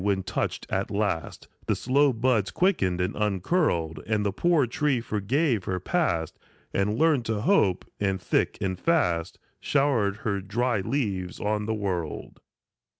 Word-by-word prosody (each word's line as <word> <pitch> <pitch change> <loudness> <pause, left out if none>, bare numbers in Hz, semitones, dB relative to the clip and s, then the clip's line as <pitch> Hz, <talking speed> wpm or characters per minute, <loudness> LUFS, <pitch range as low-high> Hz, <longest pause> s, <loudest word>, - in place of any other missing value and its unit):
When, 100 -2 +1
touched - - -2
at 95 +1 -1
last, 100 -5 -2 0.2
The - - +2
slow 140 +3 +3
buds 115 -4 +1
quickened 95 - +1
and 90 +3 -1
uncurled, 95 - 0
And 105 -1 0
the 100 - +1
poor 165 - +2
tree 130 +2 0
forgave 115 - 0
her 95 -1 -2
past, 90 - -1 0.3
And 105 +3 0
learned 155 -5 +3
to 110 -2 -1
hope, 105 - +2
and 95 -2 0
thick - - 0
and 95 -2 -2
fast 90 - +1 0.2
Showered 130 -9 +1
her 100 -3 0
dry 115 +4 0
leaves 95 -7 -2
on 105 0 -1
the 110 - 0
world. 90 -6 -4
105 Hz, 150 wpm, -26 LUFS, 95-130 Hz, 0.3 s, slow